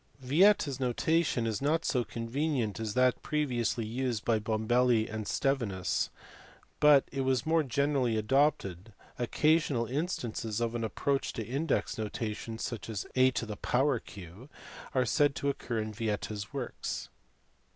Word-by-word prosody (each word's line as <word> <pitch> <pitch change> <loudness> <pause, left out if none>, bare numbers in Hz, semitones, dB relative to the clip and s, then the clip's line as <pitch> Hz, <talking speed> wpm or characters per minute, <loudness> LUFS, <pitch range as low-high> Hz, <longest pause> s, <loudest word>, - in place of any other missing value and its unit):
Vieta 160 +9 +4
s 135 -2 -4
notation 130 +1 +1
is 110 -3 -2
not 155 +4 +1
so 125 -4 +1
convenient 120 -1 -2
as 110 -1 -3
that 125 0 +3
previously 125 -6 -1
used 120 0 -2
by 115 -2 +2
Bombelli 110 +2 +2
and 110 -1 -5
Stevinns, 115 -10 0 0.7
but 150 -2 +6
it 135 - -2
was 130 -2 +1
more 160 +1 +3
generally 140 -4 +1
adopted; 110 - +1 0.3
occcasional 145 -1 +2
in 145 +8 -1
stances 115 - -3
of 115 -1 -1
an 120 -1 -2
approach 135 +5 -1
to 110 - -4
index 135 -4 -1
notation, 110 +1 -4
such 115 -1 -5
as 105 -3 -3
A 130 0 +6
q, 115 - -2 0.5
are 130 -1 +3
said 145 +5 +2
to 140 - -1
occur 120 -4 -3
in 110 0 -3
Vieta 110 -1 -2
s 105 -1 -6
works. 135 -3 -4
120 Hz, 140 wpm, -30 LUFS, 110-140 Hz, 0.7 s, but